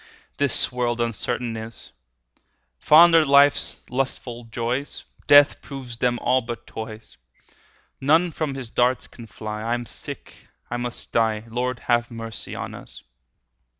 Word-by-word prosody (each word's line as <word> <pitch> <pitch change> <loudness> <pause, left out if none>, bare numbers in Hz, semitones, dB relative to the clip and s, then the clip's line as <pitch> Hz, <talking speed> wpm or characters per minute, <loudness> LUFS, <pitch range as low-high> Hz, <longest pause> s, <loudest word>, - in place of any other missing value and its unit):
This 140 -3 +1
world 120 -1 -1
uncertain 115 +1 -2
is: 110 0 -8 0.9
Fond 165 - +7
are 165 -1 +7
life's 140 0 +4
lustful 125 -2 -3
joys, 120 +4 -3 0.2
Death 145 -1 +7
proves 130 -4 -8
them 120 0 +1
all 130 0 +3
but 120 -1 -7
toys. 110 0 -9 0.8
None 160 +6 +3
from 155 -3 -3
his 125 -4 -7
darts 125 +1 +2
can 115 -2 -13
fly; 105 -1 -6
5 - - -6
I - - +2
am 120 0 -5
sick, - - -5 0.4
I 120 - -1
must 120 0 -6
die— 110 -2 +1
Lord, 125 +1 -2
have 120 -1 +1
mercy 115 -1 -7
on - - -5
us! - - -10
120 Hz, 145 wpm, -23 LUFS, 115-135 Hz, 0.9 s, Fond